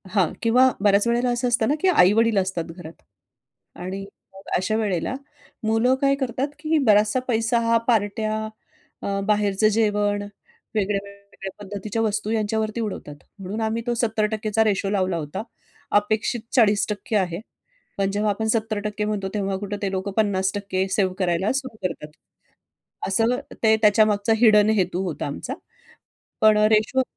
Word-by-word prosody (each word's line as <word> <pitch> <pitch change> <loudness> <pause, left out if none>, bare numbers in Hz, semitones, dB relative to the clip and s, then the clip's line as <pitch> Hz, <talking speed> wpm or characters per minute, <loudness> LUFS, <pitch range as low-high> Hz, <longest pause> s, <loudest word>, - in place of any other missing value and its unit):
हां, 185 -6 +3
किंवा 245 +3 +5 0.2
बऱ्याच 205 +2 +4
वेळेला 240 +1 +1
असं 240 +1 0
असतं 235 -2 +2
ना 290 - +2
की 380 - +2
आई-वडील 225 - +4
असतात 185 -3 0
घरात 170 -2 -11 0.8
आणि 185 +2 -5 0.3
मग 195 0 -13
अशा 190 +4 -1
वेळेला 200 -2 -1 0.5
मुलं 225 +4 +2
काय 275 0 +3
करतात 265 0 -2
की 315 +1 +1
बराचसा 210 +4 +4
पैसा 230 0 +1
हा 230 0 +4
पार्ट्या, 215 -1 +1 0.7
अ, 200 0 -2
बाहेरचं 210 0 +2
जेवण, 205 -1 +1 0.5
वेगळ्या-वेगळ्या 200 -1 -4
पद्धतीच्या 205 +2 -4
वस्तू 215 -1 -1
यांच्यावरती 220 0 -1
उडवतात, 200 -9 -5 0.2
म्हणून 195 +3 -5
आम्ही 220 +1 -1
तो 240 - 0
70% 215 -1 -1
चा 220 +1 +3
रेशो 200 -2 0
लावला 190 -3 0
होता, 150 +3 -4 0.6
अपेक्षित 215 +3 -1
40% 210 -2 +2
आहे. 180 -3 0 0.6
पण 195 0 0
जेव्हा 210 +1 0
आपण 220 +2 -2
70% 215 -2 -1
म्हणतो, 210 -2 -2
तेव्हा 195 -2 -1
कुठं 205 +1 -5
ते 195 - -1
लोकं 190 +1 -3
50% 195 -2 0
सेव्ह 190 -3 +1
करायला 180 +1 +1
सुरू 260 -4 -3
करतात. 150 -4 -4 1.0
असं 225 +6 +1 0.2
ते 220 -1 +5
त्याच्यामागचा 215 0 +4
हिडन 215 -2 +5
हेतू 185 -2 0
होता 175 -5 -4
आमचा. 145 - -5 0.9
पण 215 -1 +6 0.2
रेशो 220 +5 +3
210 Hz, 145 wpm, -23 LUFS, 195-225 Hz, 1.0 s, पण